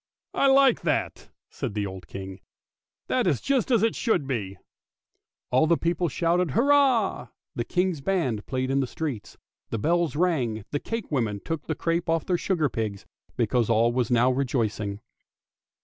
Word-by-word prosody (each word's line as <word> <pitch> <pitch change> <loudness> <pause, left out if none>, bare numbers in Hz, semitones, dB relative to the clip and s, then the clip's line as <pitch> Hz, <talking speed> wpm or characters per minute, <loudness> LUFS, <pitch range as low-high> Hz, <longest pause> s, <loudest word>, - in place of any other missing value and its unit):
" - - -68
I 275 - +3
like 270 -1 +5
that," - - -2 0.2
said 125 -7 -5
the 105 -1 -1
old 95 -3 -8
King; 95 0 -8 0.3
" - - -67
that 250 -6 +1
is 145 -8 +2
just 270 -5 0
as 230 -4 +3
it 225 - +2
should 220 - +1
be." 105 -8 -3 0.9
All 130 +5 +4
the 170 0 +3
people 170 0 0
shouted 170 +4 +1
hurrah, 265 - +3 0.3
the 120 - -2
guard's 180 +2 -1
band 135 - -1
played 130 0 -1
in 135 - +2
the 135 - 0
streets, 140 -6 -5 0.3
the 115 - -2
bells 165 +4 +1
rang, 145 -10 +1
and 105 - -11
the 145 - -1
cakewomen 130 - -2
took 165 -2 -4
the 160 - -1
crape 165 +1 -1
off 165 0 +1
the 180 - +1
sugar 170 -3 0
pigs, 110 -6 -4 0.3
because 120 -3 +1
all 115 +1 +3
was 125 -2 0
now 125 +1 +4
rejoicing. 110 -6 -1
140 Hz, 175 wpm, -26 LUFS, 115-180 Hz, 0.9 s, like